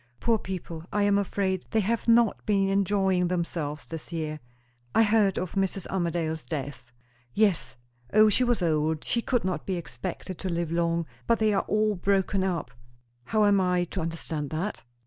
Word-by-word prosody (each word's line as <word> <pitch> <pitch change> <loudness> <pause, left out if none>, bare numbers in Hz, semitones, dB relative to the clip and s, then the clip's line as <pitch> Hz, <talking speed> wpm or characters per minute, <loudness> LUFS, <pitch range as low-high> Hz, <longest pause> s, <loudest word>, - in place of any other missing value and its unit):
"Poor 230 -2 +2
people, 175 -4 -6
I 205 - +1
am 200 0 +4
afraid 190 -2 -1
they 220 - +2
have 230 +4 -1
not 230 -1 +4
been 195 -2 +2
enjoying 195 -2 +2
themselves 165 -4 -3
this 165 +1 -8
year." 155 -2 -3 0.6
"I 225 - +6
heard 210 -3 +3
of 180 -2 -2
Mrs. 195 -1 -1
Armadale's 170 -3 -1
death." 135 -6 -6 0.4
"Yes. 200 - +1 0.3
O, 215 +1 +6
she 215 +4 +3
was 240 -6 +1
old; 155 -1 +1
she 235 - 0
could 245 -4 0
not 180 -5 -2
be 190 - 0
expected 180 +1 -6
to 185 - -3
live 170 -2 -2
long. 170 0 +1 0.2
But 230 - +4
they 215 -1 +2
are 195 - +1
all 215 0 +2
broken 195 0 +1
up." 170 -9 -2 0.5
"How 215 - +2
am 200 -1 +4
I 180 -1 +2
to 185 - -2
understand 160 -3 -3
that?" 175 +7 -3
185 Hz, 175 wpm, -27 LUFS, 165-205 Hz, 0.6 s, I